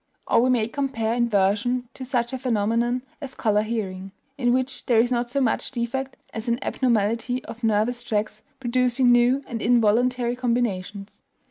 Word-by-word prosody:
Or - - +3
we 255 - +2
may 235 -4 +2
compare 235 -4 -2
inversion 235 +2 +1
to 265 - -8
such 245 -1 -1
a 260 - -3
phenomenon 240 +1 0 0.2
as 265 -2 -7
color 210 -1 +2
hearing, 195 -4 -4 0.2
in 245 -4 +1
which 260 +1 -1
there 240 - +3
is 240 +2 +3
not 240 -1 0
so 275 - -1
much 250 -5 0
defect 265 +2 -3 0.2
as 225 +2 -5
an 235 0 +1
abnormality 235 +1 0
of 235 +1 -10
nervous 225 +3 +1
tracks 215 -2 -2 0.2
producing 250 0 +2
new 245 +3 +4
and 230 -4 -5
involuntary 240 +2 +2
combinations. 215 -5 -2
240 Hz, 160 wpm, -24 LUFS, 220-250 Hz, 0.2 s, new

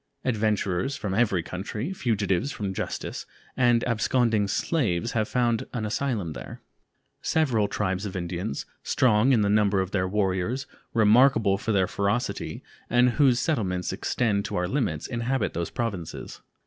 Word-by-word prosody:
Adventurers 110 0 0
from 105 -9 -3
every 100 -5 +2
country, 105 - -4
fugitives 110 - 0
from 100 -6 -3
justice, - - -4 0.3
and 120 -2 +3
absconding 115 -2 +2
slaves 110 - 0
have 110 -2 0
found 120 -2 +1
an 115 -4 -2
asylum 105 - -2
there. - - -8 0.6
Several 125 -10 +2
tribes 95 -2 -2
of 100 -3 -5
Indians, 85 -4 -3 0.2
strong 120 +1 +3
in 120 -5 +4
the 100 - +2
number 100 -1 +3
of 95 0 -1
their 95 -2 0
warriors, 100 +6 0 0.3
remarkable 110 -2 +5
for 110 - -2
their 95 -3 +3
ferocity, 100 +6 -2 0.3
and 120 +1 +4
whose 130 -2 +3
settlements 95 - -1
extend 105 -5 0
to - - -4
our 90 0 0
limits, 95 - -1
inhabit 120 0 -1
those 85 0 -2
Provinces. 100 -9 -5
105 Hz, 145 wpm, -26 LUFS, 95-120 Hz, 0.6 s, remarkable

